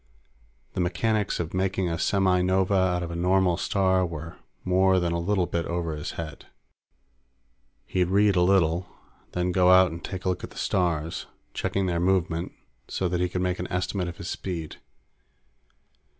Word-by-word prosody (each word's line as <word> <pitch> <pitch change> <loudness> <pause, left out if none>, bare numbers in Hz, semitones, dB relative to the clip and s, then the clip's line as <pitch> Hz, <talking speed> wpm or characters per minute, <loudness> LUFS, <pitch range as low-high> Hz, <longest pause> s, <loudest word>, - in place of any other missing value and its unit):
The - - -4
mechanics 105 +4 0
of 85 -2 -3
making 95 0 0
a 85 -1 -2
semi 95 -1 +2
nova 95 +2 +2
out 95 -2 +2
of 85 - -5
a - - -5
normal 90 +1 +2
star 95 0 +1
were 85 -2 -5 0.3
more 95 0 +3
than 85 -1 0
a 85 - 0
little 95 +1 +1
bit 85 -1 -2
over 85 -2 -2
his 75 - -5
head. 80 -3 -7 1.4
He'd 90 -1 +1
read 100 +2 +3
a 90 - +4
little 90 -2 +3 0.4
and - - -36
then 90 0 0
go 90 0 +4
out 95 -1 +6
and 85 0 -8
take 95 -1 -6
a - - +2
look 90 - -2
at - - -5
the - - -15
stars, 85 -3 -1 0.3
checking 100 -1 -1
their 85 -2 0
movement 90 -1 0 0.4
so 95 - -1
that 90 0 -1
he 90 - +1
could 90 0 -2
make 90 0 -1
an - - -5
estimate 90 0 -1
of 85 - -7
his 95 - -7
speed. 85 -7 -5
90 Hz, 180 wpm, -26 LUFS, 85-95 Hz, 1.4 s, out